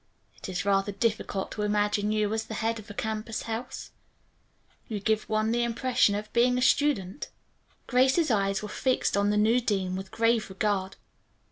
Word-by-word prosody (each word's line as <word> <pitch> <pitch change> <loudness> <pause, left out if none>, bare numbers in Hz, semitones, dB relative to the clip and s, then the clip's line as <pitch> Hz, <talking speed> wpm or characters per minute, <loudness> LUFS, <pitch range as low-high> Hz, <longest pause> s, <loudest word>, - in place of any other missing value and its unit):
It - - -9
is 185 +1 -3
rather 195 0 +2
difficult 205 -2 -2
to 210 - -4
imagine 210 0 +1
you 215 -1 +1
as 220 0 -2
the 220 - -6
head 225 +1 -1
of 215 +1 -13
a - - -7
campus 220 +1 -3
house. 230 +2 -5 1.0
You 215 -2 -3
give 215 +2 0
one 215 +1 +1
the 240 +1 +1
impression 235 -3 +2
of 210 +1 -6
being 245 +1 +3
a - - 0
student." 260 -6 +1 0.6
Grace's 265 +4 +3
eyes 195 -2 +1
were - - -4
fixed 260 +4 0
on 200 0 +2
the 210 - +1
new 220 +4 +4
dean 190 -5 -1
with 190 0 -6
grave 230 0 +1
regard. 190 -1 -1
215 Hz, 175 wpm, -27 LUFS, 200-230 Hz, 1.0 s, new